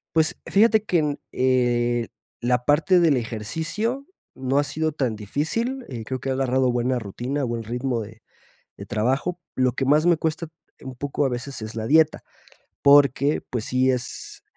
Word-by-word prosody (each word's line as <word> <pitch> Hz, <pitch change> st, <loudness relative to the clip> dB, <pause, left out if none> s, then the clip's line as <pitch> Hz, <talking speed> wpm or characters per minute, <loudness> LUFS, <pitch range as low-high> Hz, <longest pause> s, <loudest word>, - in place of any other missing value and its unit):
Pues 160 Hz, -1 st, +2 dB
fíjate 220 Hz, +1 st, +4 dB
que 180 Hz, -, +1 dB
en, 150 Hz, -2 st, -1 dB
eh, 120 Hz, -2 st, +1 dB, 0.3 s
la 125 Hz, 0 st, +1 dB
parte 165 Hz, +5 st, +4 dB
del 160 Hz, -5 st, +4 dB
ejercicio 160 Hz, -, -3 dB, 0.3 s
no 130 Hz, +1 st, 0 dB
ha 145 Hz, -, +3 dB
sido 155 Hz, +2 st, -2 dB
tan 130 Hz, -7 st, -1 dB
difícil, 225 Hz, -, -2 dB
eh, 120 Hz, -4 st, -6 dB
creo 130 Hz, +3 st, -4 dB
que 135 Hz, -, -5 dB
ha 130 Hz, -, +1 dB
agarrado 130 Hz, -1 st, +1 dB
buena 125 Hz, +1 st, 0 dB
rutina, 120 Hz, +6 st, -3 dB
buen 115 Hz, -2 st, -3 dB
ritmo 120 Hz, +1 st, -2 dB
de 110 Hz, +2 st, -12 dB, 0.6 s
de -, -, -8 dB
trabajo. 135 Hz, +11 st, -1 dB
Lo 130 Hz, -1 st, +2 dB
que 135 Hz, +2 st, -2 dB
más 150 Hz, +3 st, +4 dB
me 170 Hz, -2 st, +4 dB
cuesta 160 Hz, 0 st, -2 dB, 0.3 s
un 130 Hz, -1 st, -7 dB
poco 145 Hz, +2 st, -2 dB
a 135 Hz, -, +1 dB
veces 125 Hz, 0 st, -5 dB
es 110 Hz, +1 st, -7 dB
la 110 Hz, -1 st, -3 dB
dieta, 155 Hz, +3 st, +3 dB, 0.6 s
porque 140 Hz, 0 st, +5 dB
pues 120 Hz, -3 st, -3 dB
sí 130 Hz, +1 st, +2 dB
es 125 Hz, -1 st, -5 dB
130 Hz, 175 wpm, -23 LUFS, 120-155 Hz, 0.6 s, porque